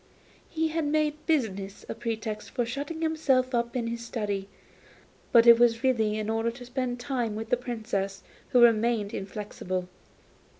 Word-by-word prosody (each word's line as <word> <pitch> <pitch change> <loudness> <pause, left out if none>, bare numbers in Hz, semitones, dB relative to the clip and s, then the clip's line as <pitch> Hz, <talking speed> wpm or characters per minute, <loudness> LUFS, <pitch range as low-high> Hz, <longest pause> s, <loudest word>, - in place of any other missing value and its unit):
He 320 -1 0
made 305 0 0
business 200 - -1
a - - -3
pretext 225 -2 -4
for 245 -3 -1
shutting 285 +7 -4
himself 275 -5 +2
up 235 +1 0
in 240 -2 0
his 235 0 -4
study, 205 -4 -3 0.8
but 235 -1 +7
it 235 -1 +9
was 235 0 +3
really 220 -5 +2
in 215 -1 -3
order 225 +1 0
to 245 +1 -9
spend 250 -1 -2
the 245 - -10
time 245 -6 -1
with 220 +1 -6
the - - +6
Princess, 220 -5 -3 0.3
who 250 - +4
remained 225 -2 +3
inflexible. 190 -2 -4
235 Hz, 160 wpm, -28 LUFS, 215-255 Hz, 0.8 s, it